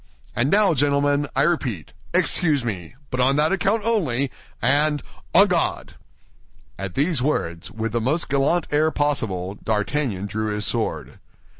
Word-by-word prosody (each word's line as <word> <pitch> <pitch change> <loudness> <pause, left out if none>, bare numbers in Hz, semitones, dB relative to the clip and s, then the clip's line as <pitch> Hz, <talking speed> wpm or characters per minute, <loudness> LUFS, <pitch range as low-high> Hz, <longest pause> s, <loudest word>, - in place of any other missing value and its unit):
And 120 +4 +1
now, 200 -1 +4
gentlemen, 145 0 +1
I 135 - +3
repeat, 130 - -1 0.2
excuse 145 -7 +2
me, 95 -4 -5 0.2
but 130 - -3
on 130 +2 +3
that 150 +3 +2
account 200 +3 +1
only, 140 - 0 0.3
and—on 145 +3 +2
guard!" - - -1 0.9
At 95 -2 -5
these 150 -1 +1
words, 85 - -2
with 110 0 -4
the 120 +1 -1
most 150 +9 0
gallant 140 +5 +1
air 155 +2 +3
possible, 115 - -1
D'Artagnan 110 -1 -1
drew 110 +2 -3
his 105 0 -1
sword. - - -2
140 Hz, 140 wpm, -22 LUFS, 110-150 Hz, 0.9 s, now